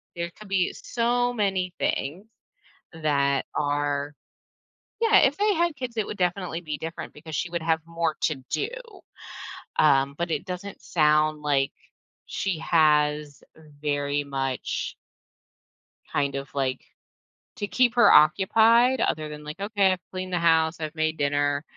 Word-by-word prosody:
There 170 0 -3
could 215 -2 -12
be 190 -2 +1
so 245 +1 0
many 190 -4 -1
things 170 +10 -2 0.7
that 140 -4 +1
are 145 0 -1 0.9
Yeah, 450 -2 +5
if 275 +2 +3
they 415 -1 +3
had 340 -1 +1
kids, 250 -2 -6
it 215 - 0
would 210 - -7
definitely 180 -2 -1
be 155 -3 -5
different 165 +1 -6
because 155 +1 -9
she 130 +7 -2
would 170 -2 -3
have 160 -1 +1
more 165 -2 -1
to 155 - +1
do. 420 - -1 1.1
Um, 140 -2 +4
but 170 0 -2
it - - -2
doesn't 185 +1 -7
sound 150 -1 +2
like 140 -2 +1 0.6
she 190 -5 -2
has 150 -2 +2 0.4
very 145 -1 -1
much 135 -2 -3 1.2
kind 140 -1 0
of 140 0 -4
like 130 -2 -1 0.8
to 205 - -3
keep 245 0 +2
her 240 - +6
occupied 225 - +5
other 155 -7 0
than 150 0 -9
like, 150 +5 -8
"Okay, 200 -2 +2
I've 180 -1 -7
cleaned 185 0 -5
the 180 - +1
house. 160 -1 +2
I've 155 0 -4
made 155 0 -1
dinner" 145 0 +1
160 Hz, 145 wpm, -25 LUFS, 145-195 Hz, 1.2 s, her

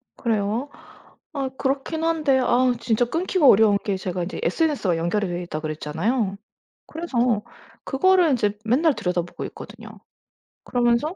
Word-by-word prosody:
그래요? 225 +4 -1 0.6
아 270 -2 -2
그렇긴 280 +4 -2
한데 310 -5 +2
아 250 0 +3
진짜 230 +1 +1
끊기가 330 +2 +1
어려운 205 -2 +6
게 200 -3 -1
제가 180 -1 -3
인제 185 - -5
SNS와 205 - +1
연결이 180 +4 0
되어 175 0 -3
있다고 155 -3 -6
그랬잖아요. 190 - -2 0.5
그래서 245 -9 -1 0.4
그거를 355 +4 +3
인제 210 -5 0
맨날 280 +6 +3
들여다보고 175 -1 -3
있거든요. 220 +1 -11 0.8
그러면서 245 +7 +1
235 Hz, 340 characters per minute, -23 LUFS, 200-280 Hz, 0.8 s, 어려운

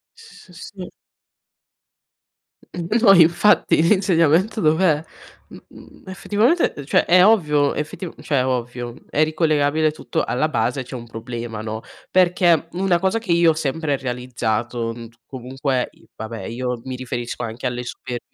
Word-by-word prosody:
S 455 - -17
sì. 190 -3 -9 1.8
N 175 -1 -5
no 210 -4 +7
infatti, 175 +1 +4
l'insegnamento 185 +2 +2
dov'è? 160 -1 +2 0.5
Mhmm, - - -16
effettivamente 210 - +1
cioè, - - +3
è 180 +1 +5
ovvio, 150 -10 +3
effetiv 155 +4 -5
cioè, 140 -4 0
ovvio, 120 -1 -3 0.2
è 150 - +1
ricollegabile 155 -1 +1
tutto, 150 - -3
alla 140 +5 0
base, 145 -3 -1
c'è 130 - -10
un 120 -2 -7
problema, 115 -1 -6
no. 110 +1 -5 0.3
Perché 175 -3 +3
una 185 -1 +1
cosa 190 +5 0
che 220 -6 -2
io 170 -1 +5
ho - - +1
sempre 155 -1 -1
realizzato, 120 -2 -3
mhmm, 115 -1 -10 0.2
comunque 130 0 -3
i - - -24
vabbè, 110 +1 -7
io 125 +1 -4
mi 130 - -5
riferisco 120 -1 -5
anche 115 +2 -5
alle 125 0 -2
superio 120 0 -6
150 Hz, 135 wpm, -21 LUFS, 125-175 Hz, 1.8 s, no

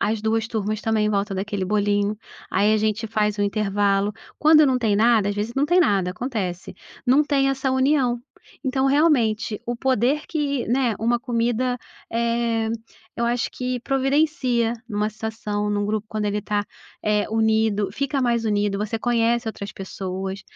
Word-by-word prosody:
as 210 +1 0
2 225 +1 0
turmas 215 -2 -2
também 220 -1 +1
em - - +1
volta 200 -1 -1
daquele 195 0 -2
bolinho, 205 +1 +1 0.3
aí 210 +2 +3
a - - +3
gente 215 +1 0
faz 210 -1 0
um 205 - +2
intervalo. 200 0 +1 0.3
Quando 310 -1 +6
não 255 -1 +2
tem 215 -4 +1
nada 220 -2 +4
às 205 - -1
vezes 215 +3 -3
não 275 - +2
tem 350 +3 +3
nada, 195 - +2
acontece. 190 -7 -4 0.3
Não 270 +4 +5
tem 275 -2 +2
essa 270 0 0
união, 260 -2 +2 0.4
então 265 0 +1
realmente, 235 -8 +2
o 240 0 -3
poder 265 +3 +1
que, 280 -5 -1
né, 245 -2 +2
uma 235 +2 +1
comida, 245 0 0 0.3
eh, 230 -1 0 0.5
eu 235 - 0
acho 240 0 0
que 250 -1 -3
providencia 270 -3 +1
numa 210 -2 -1
situação, 215 -1 -3
num 205 0 0
grupo 215 0 -2
quando 215 -1 -3
ele 205 0 -1
tá, 205 -1 0 0.4
eh, 210 -1 +2
unido, 220 -2 +2
fica 275 +4 -1
mais 235 -2 +1
unido, 205 -1 +1
você 215 +2 -2
conhece 235 0 +1
outras 205 -1 -6
pessoas. 190 0 -5
225 Hz, 165 wpm, -23 LUFS, 210-250 Hz, 0.5 s, Quando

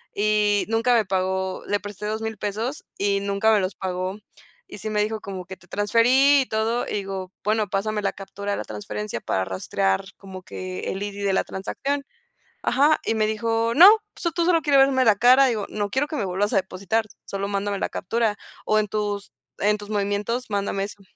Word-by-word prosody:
y 210 0 +2
nunca 230 +2 +2
me 225 -2 +3
pagó. 190 0 -1
Le 205 - +1
presté 205 +1 -7
$2000 220 0 -3
pesos 220 +8 -3
y 200 0 +1
nunca 200 +2 +1
me 210 - +4
los 185 0 -2
pagó. 185 +1 -3 0.5
Y 340 - -10
sí 215 - -4
me 210 -1 +1
dijo 220 +1 -3
como 190 -2 -6
que: 190 +1 -9
"Te - - -22
transferí 250 +7 +4
y - - -1
todo", 220 +2 0
digo: 195 -2 -4
“Bueno, 215 0 +1
pásame 210 +1 -1
la 200 - -1
captura 200 +1 -6
de - - -1
la - - -3
transferencia 105 +1 -5
para 95 0 -1
rastrear 95 - -1
como 190 -1 -10
que 185 0 -6
el 195 +1 -4
ID 205 0 -5
de 195 - +2
la - - +2
transacción”. 275 +9 -3 0.6
Ajá, 290 +5 +3
y - - +1
me 215 -1 +2
dijo: 230 +1 0
“No, 350 +5 +10 0.3
pues 340 -2 -3
tú 340 - +1
solo 340 -2 +3
quieres 285 -3 +4
verme 270 -2 +4
la 215 - +6
cara”, 250 +6 +6
y - - +2
digo: 215 -3 -2
“No 205 -1 -2
quiero 265 +8 0
que 310 - -5
me 205 - -1
vuelvas 195 +3 -1
a - - +4
depositar, 195 +4 -1 0.2
solo 200 0 -3
mándame 200 0 -1
la - - -1
captura, 225 +2 -1 0.3
o 215 - +3
en 210 - 0
tus 205 -1 -3 0.3
en 210 +1 +2
tus 205 0 -11
movimientos 210 +4 -1
mándame 200 -1 -1
eso”. 205 0 -11
205 Hz, 205 wpm, -24 LUFS, 195-225 Hz, 0.6 s, No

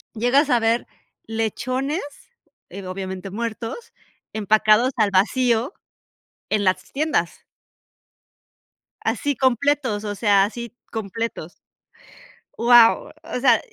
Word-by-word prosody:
llegas 255 +6 +2
a 245 - +4
ver 225 +1 +1 0.4
lechones, 255 - -2 0.7
eh, 195 -1 -8
obviamente 190 0 -6
muertos, 230 - -5 0.4
empacados 215 +3 +3
al 215 -3 +2
vacío 235 - +2 0.8
en 210 -1 +1
las 185 -1 0
tiendas. 280 - -1 1.6
Así, 285 -1 0
completos, 260 -3 +1
o 205 -1 -3
sea, 200 -2 +4
así, 235 +2 -5 0.2
completos 220 -5 -5 1.0
Wao, 235 -1 +5
o - - -4
sea, 270 - +4
225 Hz, 95 wpm, -22 LUFS, 205-255 Hz, 1.6 s, Wao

